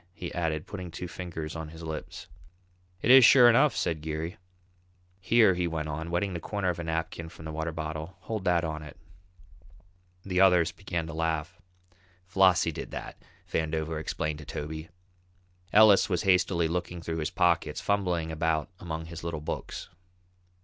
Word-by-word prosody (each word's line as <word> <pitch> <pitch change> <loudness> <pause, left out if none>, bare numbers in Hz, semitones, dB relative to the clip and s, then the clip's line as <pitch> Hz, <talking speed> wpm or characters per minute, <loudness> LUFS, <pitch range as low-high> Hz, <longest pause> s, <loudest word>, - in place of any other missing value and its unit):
he 85 - -6
added, 80 -3 -1
putting 95 -3 -7
two 90 +2 -6
fingers 80 -3 -6
on 80 -1 -5
his 80 +1 -11
lips. 80 -1 -6 0.8
"It 120 - +5
is 130 0 +10
sure 125 +1 +8
enough," 120 +1 +5
said 80 -2 -1
Geary. 80 +2 -4 0.8
"Here," 110 +1 +5
he 90 -1 -1
went 80 -2 -3
on, 80 +2 -4
wetting 90 +3 -1
the 85 - -3
corner 100 +2 -2
of 85 - -2
a - - -3
napkin 80 0 -3
from 80 - -12
the 80 - -5
water 80 +1 -3
bottle, 80 +3 -5
"hold 110 +1 -4
that 90 -2 +3
on 80 -1 -3
it." 75 -2 -11 1.3
The 90 -1 +1
others 90 -3 +5
began 85 -2 -4
to 80 - -7
laugh. 80 +1 -2 0.6
"Flossie 90 -3 +4
did - - -6
that," - - -8 0.3
Vandover 80 0 -2
explained 75 -1 -3
to 75 - -10
Toby. 80 +3 -6 0.8
Ellis 105 -1 +6
was 90 -3 0
hastily 90 -3 +3
looking 85 0 -3
through 80 0 -3
his 75 -1 -1
pockets, 85 -3 +1
fumbling 90 -5 0
about 80 -1 -1
among 80 -2 -5
his 85 0 -9
little 85 -2 -3
books. 75 - -5
85 Hz, 165 wpm, -28 LUFS, 80-90 Hz, 1.3 s, is